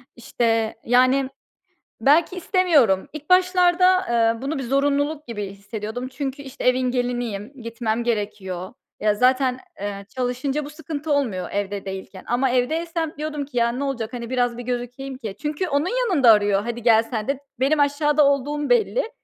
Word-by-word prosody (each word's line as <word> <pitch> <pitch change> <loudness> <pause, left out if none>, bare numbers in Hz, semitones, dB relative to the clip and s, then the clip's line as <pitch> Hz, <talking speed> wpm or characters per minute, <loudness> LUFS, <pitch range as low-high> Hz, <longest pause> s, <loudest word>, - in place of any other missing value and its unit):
İşte, 225 -2 0
yani, 255 +2 +3 0.7
belki 310 +9 +3
istemiyorum. 320 - +3
İlk 305 +2 -10
başlarda, 365 0 +4
eee, 230 0 +2
bunu 280 +2 -2
bir - - -3
zorunluluk 285 +3 0
gibi 210 -4 -4
hissediyordum 215 +5 -6
çünkü, 270 +1 -5
işte, 270 -2 -8
evin 255 0 +3
geliniyim, 245 -3 -2
gitmem 230 0 -2
gerekiyor. 200 -5 -3 0.3
Ya 210 0 +2
zaten, 255 +2 +2 0.2
eee, 200 -1 -5
çalışınca 260 +4 -2
bu 290 - -8
sıkıntı 305 -1 -4
olmuyor 220 -11 -1
evde 200 0 -3
değilken 190 0 -7
ama 250 +2 +1
evdeysem 320 +6 -1
diyordum 300 -1 -3
ki 270 -2 -13
"Ya, 235 0 +2
ne 260 +4 -3
olacak? 240 -4 -3
Hani, 235 -1 -6
biraz 245 -2 0
bir - - -5
gözükeyim 250 +2 -4
ki" 215 -6 -6
Çünkü 300 +5 -2
onun 285 +3 +1 0.2
yanında 270 -10 +6
arıyor, 205 -2 +3
"Hadi, 235 +1 -5
gel 225 -1 +5
sen 225 -2 -5
de." 275 -1 -1 0.2
Benim 290 +3 +2
aşağıda 290 +1 +3
olduğum 285 +1 0
belli. 485 0 +2
255 Hz, 160 wpm, -23 LUFS, 225-290 Hz, 0.7 s, yanında